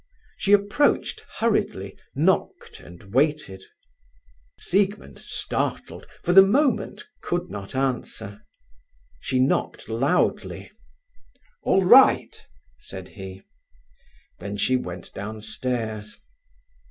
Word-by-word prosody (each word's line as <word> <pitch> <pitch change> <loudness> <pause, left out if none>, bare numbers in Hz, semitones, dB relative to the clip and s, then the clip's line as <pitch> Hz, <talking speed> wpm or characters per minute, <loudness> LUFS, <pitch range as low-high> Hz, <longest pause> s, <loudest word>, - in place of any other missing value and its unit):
She 200 - -1
approached 205 +8 +2
hurriedly, 100 - -1 0.2
knocked, 165 +7 0
and 90 +3 -14
waited. 140 -8 +1 1.0
Siegmund, 200 +2 -1
startled, - - -3 0.2
for 175 - +1
the 195 - +11
moment, 265 - +1 0.2
could 175 +1 -3
not 100 +3 -7
answer. 120 -6 -3 0.8
She 130 - -2
knocked 130 +2 0
loudly. 135 +11 0 0.9
"All 190 - +2
right," 260 +8 +6 0.4
said 95 -1 -10
he. 95 -1 -10 1.0
Then 100 +2 -5
she 130 +5 +2
went 90 -8 -5
downstairs. 110 +1 -4
130 Hz, 90 wpm, -24 LUFS, -, 1.0 s, the